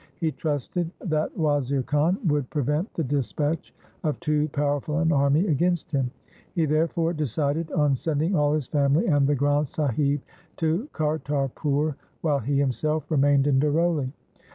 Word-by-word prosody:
He 160 -2 0
trusted 155 +3 -2
that 155 -3 -1
Wazir 140 -4 +1
Khan 150 +7 +1
would 145 -5 +1
prevent 150 - -1
the 165 - 0
dispatch 145 +3 -1 0.3
of 150 -2 -1
too 150 0 0
powerful 145 +1 -1
an 165 -1 +2
army 140 +4 +3
against 175 +1 0
him. 135 -4 0 0.5
He 165 -3 +2
therefore 165 +2 +1
decided 150 +2 -1
on 145 -3 +2
sending 160 +6 0
all 145 -2 +3
his 150 -4 -1
family 140 +3 +2
and 145 -4 +3
the 145 - +2
Granth 145 +2 +1
Sahib 140 0 0 0.4
to 165 - 0
Kartarpur, 150 -1 -1 0.3
while 150 -4 +1
he 140 +4 -1
himself 150 +3 0
remained 140 -2 +4
in 140 -2 +3
Daroli. 150 -2 +1
150 Hz, 150 wpm, -25 LUFS, 140-160 Hz, 0.5 s, remained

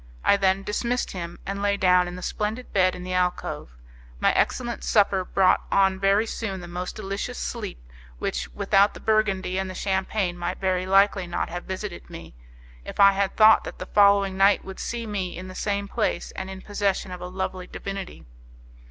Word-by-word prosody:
I - - +6
then 195 0 +1
dismissed 235 +4 -1
him, 170 -2 -6
and 200 +1 -4
lay 200 0 +1
down 180 -2 +4
in 175 - -6
the 180 - -8
splendid 215 +4 -3
bed 185 -2 +3
in 180 - -8
the 185 0 -4
alcove; 180 - -2 0.4
my - - +3
excellent 240 -2 0
supper 200 -3 +3
brought 185 0 +3
on 190 -1 +3
very 195 +3 +3
soon 205 -4 -4
the 175 - -9
most 180 +1 -5
delicious 200 - -4
sleep - - -4 0.4
which, - - -3
without 195 - +3
the - - -8
Burgundy 195 -4 +1
and 190 0 -3
the 185 - -7
Champagne, 190 -1 -1
might 175 +1 -3
very 185 -1 0
likely 195 -1 +3
not 175 - -2
have 175 +1 -6
visited 190 -1 -6
me, 165 - -10 0.5
if - - -9
I 200 0 +8
had 195 0 -1
thought 220 0 +7
that - - -8
the - - -6
following 200 -1 +4
night 195 +1 +4
would 190 0 -8
see 235 -1 -4
me 195 -5 -3
in 185 +1 -7
the - - -8
same 200 +1 -2
place, - - -2
and 190 0 -6
in 190 0 -8
possession 200 -2 -1
of 180 - -7
a 180 - -5
lovely 185 0 -4
divinity. 195 -1 -7
190 Hz, 195 wpm, -25 LUFS, 180-200 Hz, 0.5 s, I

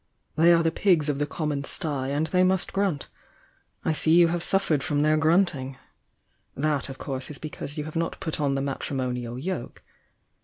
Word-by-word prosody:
"They 165 +2 +5
are 170 -1 +4
the 165 - +2
pigs 165 -4 +2
of 145 -1 -1
the 145 - 0
common 150 -2 -3
stye, 140 -2 -3
and 145 +3 0
they 180 +3 +2
must 185 0 +1
grunt. 195 -7 -1 0.8
I 160 - +2
see 155 - +3
you 170 -1 +6
have 175 0 -1
suffered 165 -6 +3
from 145 +1 0
their 155 0 +3
grunting! 155 -5 +1 0.8
That, 145 -1 0
of 135 - -8
course, 130 -2 -5
ia 150 - -7
because 150 -1 -7
you 150 - -2
have 155 +1 -8
not 165 0 -2
put 160 -1 -3
on 140 -2 +1
the 135 - -1
matrimonial 125 -3 -3
yoke. 165 -1 -5
150 Hz, 190 wpm, -25 LUFS, 140-165 Hz, 0.8 s, you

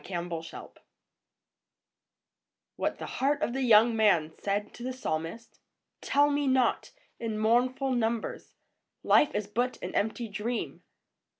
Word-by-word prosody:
A - - -22
PSALM 175 -1 -4
OF 165 0 -6
LIFE. - - -9 2.1
■WHAT - - -1
THE - - -6
HEART 285 +3 0
OF 235 - -1
THE 270 - -2
YOUNG 230 -1 +5
MAN 175 -8 +3
SAID 205 +1 -2
TO - - -12
THE 255 +1 -3
PSALMIST. 170 -2 -5 0.4
Tell 290 +1 +3
me 290 0 0
not, 260 -2 +2 0.3
in 225 -2 -3
mournful 250 +5 +1
numbers, 230 -2 -2 0.5
Life 295 - +4
is 210 - -1
but 240 +5 -2
an - - -5
empty 220 +3 -1
dream 215 +4 -4
230 Hz, 140 wpm, -29 LUFS, 205-255 Hz, 2.1 s, YOUNG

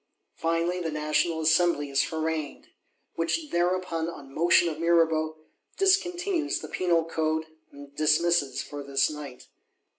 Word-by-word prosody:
Finally, 165 +2 -1
the 165 - -2
National 155 +2 0
Assembly 160 -2 +2
is 135 - +2
harangued; 160 -2 -4 0.4
which 285 - -2
thereupon, 175 -2 0
on 140 -5 -11
motion 170 +2 +4
of 155 -2 -4
Mirabeau, 160 -2 +2 0.4
discontinues 360 -3 +1
the - - -8
Penal 170 -3 +1
Code, 160 -1 -1 0.3
and 140 0 -13
dismisses 155 -1 +2
for 145 -1 -8
this 140 +1 +1
night. 145 -4 -9
165 Hz, 125 wpm, -27 LUFS, 155-175 Hz, 0.4 s, motion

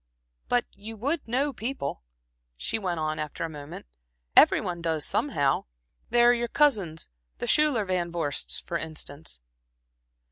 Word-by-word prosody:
"But 245 0 +3
you 220 +3 -9
would 280 +5 -1
know 270 +5 +1
people," 230 - -4 0.6
she 220 - 0
went 180 -5 -2
on, 155 0 -1
after 155 +1 -4
a 165 - -2
moment 150 +1 -9 0.5
"every - - +8
one 175 -1 -4
does 160 -2 0
somehow. 145 - +1 0.4
There 240 0 +6
are - - +5
your 240 0 0
cousins, 210 - +2 0.3
the - - -3
Schuyler 295 -8 +3
Van 180 -2 -1
Vorsts, 160 -5 -2
for 170 - -3
instance." 155 - -5
180 Hz, 145 wpm, -27 LUFS, 155-240 Hz, 0.6 s, every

